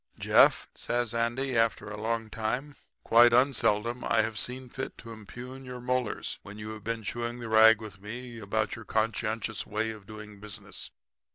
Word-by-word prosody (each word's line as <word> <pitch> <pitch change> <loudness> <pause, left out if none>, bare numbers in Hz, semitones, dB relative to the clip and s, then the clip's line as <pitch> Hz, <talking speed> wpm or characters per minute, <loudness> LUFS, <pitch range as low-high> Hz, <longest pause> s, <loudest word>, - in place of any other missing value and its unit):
"'Jeff,' - - +5
says 120 -1 -1
Andy 120 +3 0
after 115 -2 +1
a 105 0 -6
long 115 0 -1
time, 125 +7 -2 0.3
'quite 120 +1 +7
unseldom 120 -2 +2
I 110 - +3
have 110 0 -2
seen 130 +1 -3
fit 130 +2 -6
to 115 - -10
impugn 125 +5 -9
your 125 -1 -7
molars 125 -2 -2
when 100 +1 -10
you 105 0 -6
have 110 -1 -8
been 115 0 -3
chewing 120 +2 -3
the 120 -1 -6
rag 110 0 +7
with 105 -4 -10
me 120 +3 -7
about 110 +1 -1
your 115 - -9
conscientious 110 0 -1
way 110 +1 -1
of 105 -3 -11
doing 105 -1 -10
business. 105 -1 -7
115 Hz, 175 wpm, -29 LUFS, 110-120 Hz, 0.3 s, quite